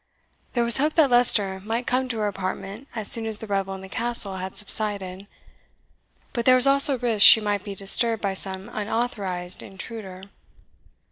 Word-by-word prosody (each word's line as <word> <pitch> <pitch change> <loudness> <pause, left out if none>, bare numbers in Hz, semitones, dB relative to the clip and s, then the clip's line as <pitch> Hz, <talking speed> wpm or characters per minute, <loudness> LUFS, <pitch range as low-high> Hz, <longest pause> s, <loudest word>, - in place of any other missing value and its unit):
There 240 - 0
was 235 -1 +4
hope 300 +3 -1
that 300 -6 +2
Leicester 210 -6 +1
might 230 +3 -4
come 255 +1 -2
to 235 - -4
her 210 -1 -2
apartment 195 +5 -7
as 215 -3 -4
soon 225 -1 +4
as 220 -1 -5
the 220 - -10
revel 195 -2 -4
in 190 - -11
the 190 - -11
Castle 225 -2 +4
had 185 0 -8
subsided; 200 -2 -4 1.1
but 235 -2 -4
there 255 - +5
was 255 +1 +2
also 275 0 +5
risk 230 -4 +1
she - - +9
might 205 -2 -3
be 200 -2 -8
disturbed 225 +4 +1
by 200 -2 -3
some 190 +1 -4
unauthorized 205 -5 -4
intruder. 190 -1 -11
210 Hz, 180 wpm, -22 LUFS, 195-235 Hz, 1.1 s, she